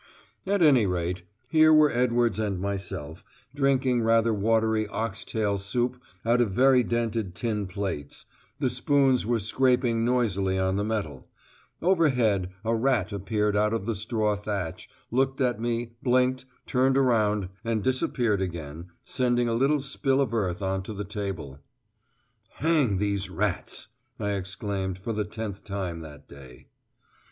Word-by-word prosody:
At 200 -2 +2
any 130 -9 +5
rate, 90 0 -2 0.3
here 155 +4 +5
were 155 -1 +6
Edwards 120 -3 +1
and 100 -4 -1
myself, 95 -5 -5 0.3
drinking 135 -3 +2
rather 115 0 +3
watery 110 +1 +1
ox 110 -1 -4
tail 105 -3 -1
soup 120 +5 -2 0.2
out 120 +2 +3
of 115 - +2
very 130 +6 +4
dinted 115 -5 -2
tin 105 -3 -2
plates 90 -7 -5 0.3
the 125 - 0
spoons 130 -2 +2
were 120 0 +2
scraping 120 +1 +1
noisily 100 -6 +1
on 95 0 +1
the 100 - 0
metal; 100 -11 -4 0.5
overhead, 125 - +2 0.2
a 115 +1 +2
rat 115 -5 +1
appeared 105 +1 0
out 105 +2 +2
of 100 - -3
the 115 - 0
straw 105 0 0
thatch, 100 -4 -4 0.2
looked 135 +2 +1
at 125 -5 +1
me, 120 0 -2
blinked, 130 0 +2 0.2
turned 130 +1 +2
about, 105 -7 +2
and 115 -2 -1
disappeared 120 -5 +1
again, 85 -2 -5 0.2
sending 120 -1 +1
a 115 - 0
little 135 +5 +2
spill 135 0 0
of 130 -5 0
earth 100 -4 -1
on 95 0 -1
to 100 +3 -7
the 105 +1 -4
table. 95 - -5 1.0
"Hang 150 - +2
these 100 -1 -1
rats," - - -3 0.3
I 105 -2 -1
exclaimed, 95 -1 -3
for 110 +5 -4
the 105 -1 -1
tenth 105 -2 -6
time 95 -5 -4
that 75 -3 -11
day. 65 -3 -14
110 Hz, 145 wpm, -26 LUFS, 95-125 Hz, 1.0 s, were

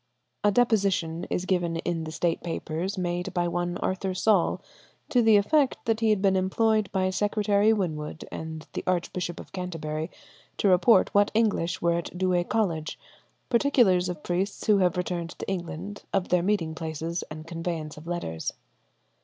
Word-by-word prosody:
A 205 - +5
deposition 195 -8 +1
is 180 - -1
given 175 -3 0
in 165 -1 -2
the 155 - -5
State 170 +1 0
Papers 170 +3 -3
made 180 +1 -2
by 175 -1 +1
one 175 0 -2
Arthur 185 0 -2
Saul, 195 -2 +2 0.5
to 245 - +4
the 220 -2 +6
effect 275 +7 +3
that 225 -1 +1
he 225 -1 +2
had 210 -2 +2
been 195 -1 +4
employed 215 +3 +2
by 185 -1 +1
Secretary 205 +1 +2
Winwood 160 -7 -2
and 160 -1 -6
the - - -3
Archbishop 175 -1 -1
of - - -11
Canterbury 160 -3 -4 0.5
to - - +2
report 190 +3 +5
what 205 0 +4
English 205 -8 +1
were 170 0 +3
at 170 - -7
Douay 180 -1 +2
College, 170 -9 -1 0.5
particulars 235 -8 +3
of 170 -4 -6
priests 185 +3 -2
who 210 -2 +4
have 180 -2 +2
returned 175 -2 -3
to - - -6
England, 190 +2 -4
of 195 -2 0
their 180 -1 +3
meeting 180 -4 0
places 160 +1 -4
and 155 0 -8
conveyance 165 -2 -4
of 155 +2 -12
letters. 170 - -3
180 Hz, 165 wpm, -27 LUFS, 165-205 Hz, 0.5 s, the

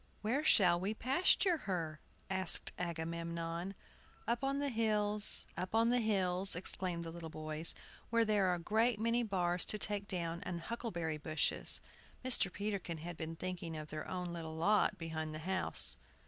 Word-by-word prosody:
"Where 250 +8 0
shall 180 - +5
we 200 +4 -2
pasture 335 - +3
her?" 165 - -3 0.3
asked 190 -2 +4
Agamemnon. 170 +1 -4 0.5
"Up 235 +2 0
on 275 +1 0
the 285 0 0
hills, 210 -3 +2
up 185 +4 -4
on 230 +1 +4
the 245 - +3
hills," 190 -4 +2
exclaimed 180 -1 -1
the 165 - -6
little 165 -1 -7
boys, 155 +1 -3 0.3
"where 230 0 +3
there 210 -3 +2
are 180 - +2
a - - -5
great 220 +5 +1
many 230 +2 +1
bars 180 -5 0
to 215 - 0
take 205 -1 -1
down, 170 -2 -2
and 175 -2 -4
huckleberry 170 -7 -4
bushes!" 155 +1 +1 0.4
Mr. 240 -7 +3
Peterkin 200 -5 -3
had 170 +2 -7
been 160 0 -5
thinking 175 -2 -5
of 155 -1 -7
their 155 0 -5
own 180 -2 -4
little 160 -2 -6
lot 200 +4 +2
behind 160 -2 -4
the 155 +1 -8
house. 190 0 +4
185 Hz, 165 wpm, -35 LUFS, 165-215 Hz, 0.5 s, shall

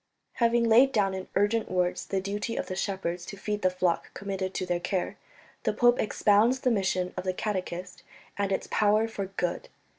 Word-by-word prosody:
Having 235 0 +3
laid 245 +4 +6
down 200 -5 +2
in 190 0 -5
urgent 215 +3 +2
words 180 -1 0
the 195 - 0
duty 205 +4 -3
of - - -2
the 185 - -5
shepherds 185 -3 -2
to 200 - -7
feed 210 +1 -3
the 185 - +4
flock 180 -2 -1
committed 195 -1 -3
to 185 - -1
their 175 -1 0
care, 180 +1 -2 0.5
the - - 0
pope 240 0 +4
expounds 215 +4 +3
the 255 - +2
mission 185 -4 0
of 185 - -4
the 185 -1 -2
catechist, 185 -3 -4 0.3
and 200 -1 -1
its 190 - -1
power 215 +1 +3
for 200 -3 -4
good. 180 -2 -3
195 Hz, 190 wpm, -28 LUFS, 185-215 Hz, 0.5 s, laid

